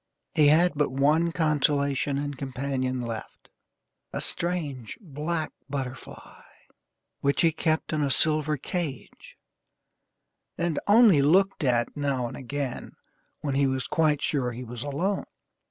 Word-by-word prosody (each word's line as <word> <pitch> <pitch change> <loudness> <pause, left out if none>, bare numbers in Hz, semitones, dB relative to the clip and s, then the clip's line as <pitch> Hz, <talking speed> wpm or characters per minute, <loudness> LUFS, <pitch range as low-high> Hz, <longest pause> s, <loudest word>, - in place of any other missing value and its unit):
He 150 -2 +5
had 165 +4 +5
but 150 0 +1
one 150 +5 +3
consolation 145 -3 +1
and 145 0 -3
companion 130 -1 -2
left 115 -2 -7 0.6
a - - -3
strange, 150 -9 -3
black 155 -2 -3 0.2
butterfly, 130 -3 -7 0.8
which 140 0 +1
he 165 - +5
kept 160 0 -1
in 155 - +1
a 140 - +1
silver 155 +1 +2
cage, 150 -2 -5 1.2
and 170 -3 0
only 205 -7 +7
looked 185 +6 +3
at 120 -3 +1
now 140 -4 -1
and - - -8
again, 135 -1 -4 0.5
when 140 -2 -2
he 140 0 +3
was 130 -2 -1
quite 150 -3 +1
sure 135 -5 0
that 120 - -7
he 125 - -5
was 120 -1 -7
alone. 170 +9 -1
145 Hz, 135 wpm, -27 LUFS, 130-160 Hz, 1.2 s, only